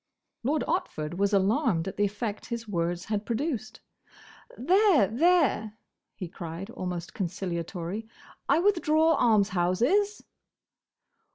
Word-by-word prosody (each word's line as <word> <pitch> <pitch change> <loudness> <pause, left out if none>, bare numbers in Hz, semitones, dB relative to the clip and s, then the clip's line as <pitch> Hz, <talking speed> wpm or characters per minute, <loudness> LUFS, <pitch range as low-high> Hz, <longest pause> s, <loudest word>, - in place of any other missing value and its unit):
Lord 290 +5 0
Otford 175 - -2
was 200 +1 +1
alarmed 200 - +2
at 190 - -5
the 205 - +2
effect 205 +1 -4
his 235 -1 -5
words 175 -2 -2
had 210 -1 -2
produced. 245 +1 -3 0.8
"There! 365 - +4
there!" 255 - +2 0.4
he 185 - -6
cried, 170 +3 -7
almost 180 -4 -5
conciliatorily, 180 +1 -4 0.4
"I - - +5
withdraw 325 -4 +3
'Almshouses! 230 - +2
215 Hz, 105 wpm, -27 LUFS, 185-295 Hz, 0.8 s, I